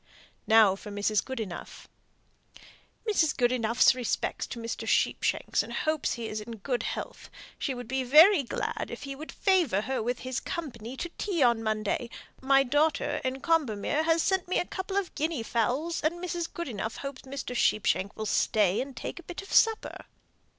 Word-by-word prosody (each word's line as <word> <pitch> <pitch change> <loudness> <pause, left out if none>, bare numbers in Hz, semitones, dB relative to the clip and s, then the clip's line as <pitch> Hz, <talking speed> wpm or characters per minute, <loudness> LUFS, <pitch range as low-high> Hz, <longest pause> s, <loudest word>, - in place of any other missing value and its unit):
Now 220 -4 +6
for 200 - -10
Mrs. 205 +1 0
Goodenough. 220 -9 -6 1.2
"Mrs. 330 -8 +2
Goodenough's 240 -2 +4
respects 250 -1 -2
to - - -7
Mr. 230 0 -5
Sheepshanks, - - +1
and - - -8
hopes 310 -2 0
he 235 -2 -5
is 215 0 -4
in 230 +2 -8
good 240 +4 -2
health. - - -5 0.3
She 270 - -2
would 245 -2 -7
be 265 +2 -1
very 310 +8 +7
glad 250 - -3
if - - -7
he 275 -1 -5
would 310 +3 -8
favour 345 - +2
her 260 +3 -2
with 245 +2 -1
his 255 0 -3
company 255 -7 -6
to 345 - -4
tea 360 -8 +1
on 235 -2 +3
Monday. 215 +2 -1 0.3
My 270 +1 +5
daughter, 290 +3 +1
in 260 +1 -2
Combermere, 290 -4 +1
has 325 0 +2
sent 380 -2 +1
me 370 - 0
a - - +1
couple 380 +2 -4
of 395 -3 -1
guinea 310 -5 -1
fowls, 255 +9 -1
and 310 +3 +1
Mrs. 345 -1 -4
Goodenough 230 - -4
hopes 275 -1 -6
Mr. 265 -2 -6
Sheepshanks 200 -3 +1
will 220 - -4
stay 210 -2 +2
and 270 0 -7
take - - -5
a 345 - -15
bit 355 +2 -6
of 390 - -9
supper." 450 -1 +2
260 Hz, 175 wpm, -28 LUFS, 225-325 Hz, 1.2 s, very